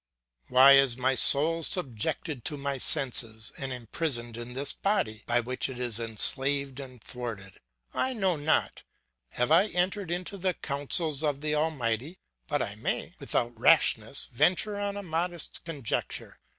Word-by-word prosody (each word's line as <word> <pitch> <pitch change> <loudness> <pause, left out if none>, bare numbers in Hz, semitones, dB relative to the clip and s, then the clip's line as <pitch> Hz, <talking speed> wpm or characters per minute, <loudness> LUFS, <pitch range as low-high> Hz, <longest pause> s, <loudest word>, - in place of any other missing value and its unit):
Why 130 +2 +7
is 135 -3 +2
my 130 +1 +1
soul 155 +6 +7
subjected 140 - -3
to 150 - -1
my 140 -1 -4
senses, 115 -5 +1
and 135 -1 -5
imprisoned 120 0 -2
in 120 +1 -8
this 140 +1 +1
body 115 - -2
by 120 0 +2
which 130 +3 -3
it 130 - -8
is 120 -3 0
enslaved 135 +4 +1
and 130 -4 -10
thwarted? 110 -7 -8 0.3
I 260 - -1
know 190 -6 0
not; 150 +1 -1 0.5
have 125 +4 -1
I 170 +6 +5
entered 185 0 -2
into 180 +3 -5
the 185 -1 -1
counsels 145 +1 -2
of 145 -2 -1
the 150 0 -2
Almighty? 150 - -2 0.3
But - - -1
I - - -3
may, - - -4
without 120 0 -1
rashness, 115 -2 +2
venture 185 - +1
on 200 0 -3
a 200 - -6
modest 170 0 -4
conjecture. 145 -9 -4
140 Hz, 150 wpm, -27 LUFS, 120-165 Hz, 0.5 s, Why